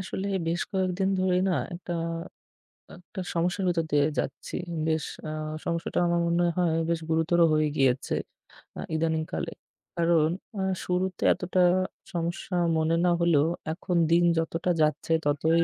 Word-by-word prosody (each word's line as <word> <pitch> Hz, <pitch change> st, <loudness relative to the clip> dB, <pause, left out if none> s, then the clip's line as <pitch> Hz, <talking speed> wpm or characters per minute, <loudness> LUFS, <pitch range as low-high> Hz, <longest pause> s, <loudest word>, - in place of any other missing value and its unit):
আসলে 190 Hz, +1 st, -4 dB, 0.2 s
বেশ 170 Hz, +2 st, 0 dB
কয়েকদিন 190 Hz, 0 st, 0 dB
ধরেই 185 Hz, 0 st, +2 dB
না -, -, +2 dB, 0.2 s
একটা, 175 Hz, 0 st, -6 dB, 1.1 s
একটা 185 Hz, +2 st, -8 dB
সমস্যার 175 Hz, +3 st, 0 dB
ভিতর 170 Hz, -2 st, +1 dB
দিয়ে 145 Hz, 0 st, +4 dB
যাচ্ছি। 135 Hz, -, -4 dB, 0.3 s
বেশ 160 Hz, -1 st, +1 dB, 0.3 s
আ -, -, -3 dB, 0.3 s
সমস্যাটা 170 Hz, -1 st, -1 dB
আমার 170 Hz, 0 st, +2 dB
মনে 170 Hz, +1 st, +2 dB
হয় 175 Hz, -3 st, +2 dB, 0.2 s
বেশ 170 Hz, -1 st, +1 dB
গুরুতর 160 Hz, +2 st, +2 dB
হয়ে 155 Hz, 0 st, +3 dB
গিয়েছে, 135 Hz, 0 st, +2 dB, 0.6 s
আ -, -, -4 dB
ইদানীংকালে। 160 Hz, -, -1 dB, 0.5 s
কারণ 165 Hz, -2 st, +3 dB, 0.3 s
আ -, -, 0 dB, 0.2 s
শুরুতে 185 Hz, 0 st, -1 dB
এতটা 185 Hz, 0 st, 0 dB, 0.5 s
সমস্যা 175 Hz, +2 st, -3 dB, 0.2 s
মনে 160 Hz, +1 st, +2 dB
না 175 Hz, -, +4 dB
হলেও 160 Hz, -3 st, +4 dB, 0.3 s
এখন 180 Hz, +1 st, -3 dB, 0.2 s
দিন 170 Hz, +1 st, +5 dB
যতটা 165 Hz, +2 st, 0 dB
যাচ্ছে 155 Hz, +1 st, +1 dB
ততই 160 Hz, +3 st, +3 dB
170 Hz, 140 wpm, -27 LUFS, 160-180 Hz, 1.1 s, দিন